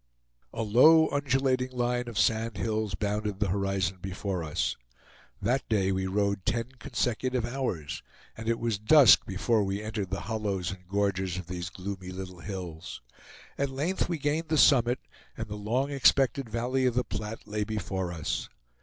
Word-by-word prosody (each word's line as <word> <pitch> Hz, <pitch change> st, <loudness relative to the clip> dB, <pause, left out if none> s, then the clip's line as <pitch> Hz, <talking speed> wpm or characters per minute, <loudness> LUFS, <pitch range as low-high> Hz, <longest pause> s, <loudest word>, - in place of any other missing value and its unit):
A 115 Hz, -, -3 dB
low 155 Hz, +9 st, +6 dB
undulating 130 Hz, -2 st, +1 dB
line 120 Hz, 0 st, 0 dB
of 120 Hz, -, -6 dB
sand 110 Hz, -2 st, +1 dB
hills 110 Hz, -3 st, -1 dB
bounded 105 Hz, 0 st, -2 dB
the 105 Hz, -2 st, +1 dB
horizon 95 Hz, -1 st, 0 dB
before 95 Hz, -1 st, -3 dB
us. 75 Hz, -1 st, -1 dB, 0.6 s
That 125 Hz, +6 st, 0 dB
day 95 Hz, -3 st, +2 dB
we 95 Hz, 0 st, -1 dB
rode 100 Hz, 0 st, 0 dB
ten 115 Hz, +4 st, -1 dB
consecutive 125 Hz, +2 st, -1 dB
hours, 120 Hz, -, -3 dB, 0.3 s
and 115 Hz, 0 st, -4 dB
it 115 Hz, -, +2 dB
was 115 Hz, -4 st, -1 dB
dusk 130 Hz, +2 st, +7 dB
before 105 Hz, +3 st, +1 dB
we 100 Hz, +2 st, -2 dB
entered 105 Hz, -3 st, -3 dB
the 95 Hz, +1 st, -3 dB
hollows 100 Hz, -5 st, -2 dB
and 90 Hz, -2 st, -10 dB
gorges 95 Hz, -2 st, 0 dB
of 90 Hz, -, -5 dB
these 90 Hz, 0 st, -5 dB
gloomy 95 Hz, -1 st, -6 dB
little 95 Hz, -1 st, -7 dB
hills. 85 Hz, -, -7 dB, 0.6 s
At 140 Hz, 0 st, +1 dB
length 150 Hz, +10 st, -1 dB
we 170 Hz, -, -1 dB
gained 150 Hz, +3 st, -1 dB
the 155 Hz, -, +2 dB
summit, 125 Hz, -3 st, +5 dB, 0.4 s
and 110 Hz, -, -4 dB
the 105 Hz, -, -5 dB
long 120 Hz, +7 st, -1 dB
expected 135 Hz, -2 st, +3 dB
valley 125 Hz, +3 st, 0 dB
of 120 Hz, -, 0 dB
the 125 Hz, -, +2 dB
Platte 110 Hz, -1 st, -6 dB
lay 105 Hz, 0 st, -1 dB
before 95 Hz, -4 st, -3 dB
us. 80 Hz, -4 st, -3 dB
105 Hz, 165 wpm, -28 LUFS, 95-125 Hz, 0.6 s, dusk